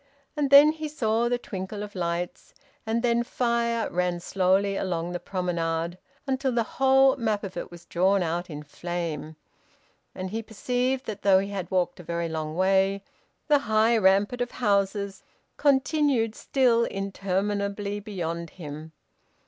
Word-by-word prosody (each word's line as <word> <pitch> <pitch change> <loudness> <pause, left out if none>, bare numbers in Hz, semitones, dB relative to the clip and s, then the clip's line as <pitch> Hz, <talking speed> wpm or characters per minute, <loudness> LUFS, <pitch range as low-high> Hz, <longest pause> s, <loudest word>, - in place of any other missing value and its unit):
And 290 -2 0
then 285 +2 +9
he 310 0 -5
saw 235 -5 0
the 245 - +1
twinkle 200 -2 -6
of 205 0 -8
lights, 175 -1 -4 0.3
and 230 +2 0
then 235 -1 +3
fire 235 -1 0
ran 180 0 0
slowly 190 +2 +1
along 175 -3 -2
the 175 - -3
promenade: 170 -2 -2 0.3
until 265 -1 0
the 235 -1 +1 0.2
whole 270 0 +6
map 220 -4 -1
of 195 -2 -6
it - - -5
was 175 0 -13
drawn 190 +2 +2
out 175 +2 -2
in 150 -1 -7
flame; 160 0 -5 0.8
and 185 0 -5
he 225 +2 -2
perceived 250 +4 -1
that 205 -2 -6
though 195 -2 +5
he 195 +1 -1
had 190 -3 -4
walked 180 -1 0
a - - -9
very 170 0 -2
long 155 -1 -4
way, 195 +2 +2 0.4
the 295 -2 +5
high 220 +2 +4
rampart 205 +3 +3
of 245 - -1
houses 200 -3 0 0.3
continued 275 -4 +2
still 240 -2 +2
interminably 200 +1 -2
beyond 170 -5 -4
him. 155 -1 -9
200 Hz, 150 wpm, -26 LUFS, 175-235 Hz, 0.8 s, then